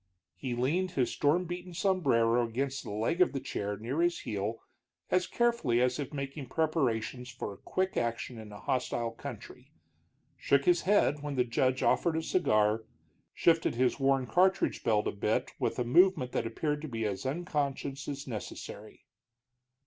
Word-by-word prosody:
He 125 -3 -4
leaned 170 +10 0
his 130 -7 +1
storm 155 +5 +2
beaten 175 0 -6
sombrero 125 - +2
against 135 +4 -2
the - - -8
leg 110 - 0
of 180 - +5
his 135 - -3
chair 105 0 -3
near 125 +10 -2
his 175 0 +1
heel, 105 -1 -3 0.5
as 180 0 +2
carefully 235 - +1
as 125 +2 +1
if 140 - -4
making 140 -2 -5
preparations 130 -6 0
for 120 -5 -6
quick 185 0 -2
action 115 0 -2
in 110 -1 -10
a 105 - -9
hostile 120 -2 -1
country, - - -9 0.6
shook 140 0 +2
his 175 -1 +4
head 150 -8 +3
when 145 -1 -4
the 125 - +3
judge 130 +2 +1
offered 170 -2 +2
a 160 - -1
cigar, 110 -10 +2 0.5
shifted 165 -6 +3
his 125 +3 +1
worn 135 -1 +2
cartridge 185 +8 +2
belt 110 -3 +2
a - - 0
bit 105 +2 -1
with - - -1
a 125 - +1
movement 130 0 +4
that 115 - -1
appeared 150 +5 -2
to 155 - -5
be 115 -4 -3
as 100 +1 -2
unconscious 140 -2 -2
as 140 -1 -4
unnecessary. 115 -5 -8
135 Hz, 165 wpm, -31 LUFS, 115-165 Hz, 0.6 s, of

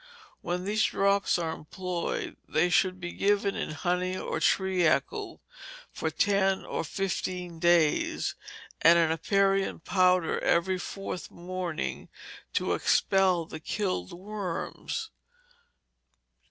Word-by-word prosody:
When 180 +1 -3
these 215 +2 +1
drops 200 -1 +2
are 165 -2 -2
employed, 180 +3 -4
they 170 +3 +2
should 185 0 +2
be 175 -1 -5
given 200 0 +1
in - - -3
honey 180 +3 -1
or 160 - -3
treacle 185 -1 +1 0.5
for 160 - -2
ten 195 +3 +1
or - - -3
fifteen 180 -1 -3
days, 170 -3 +2 0.5
and 170 +1 +7
an 165 -2 +3
aperient 195 +2 +1
powder 185 -3 +3
every 185 +2 +1
fourth 195 0 -6
morning, 175 -2 -4 0.4
to - - +1
expel 190 -3 +2
the 155 - -8
killed 160 - -2
worms. 205 - -5
180 Hz, 110 wpm, -28 LUFS, 170-195 Hz, 0.5 s, and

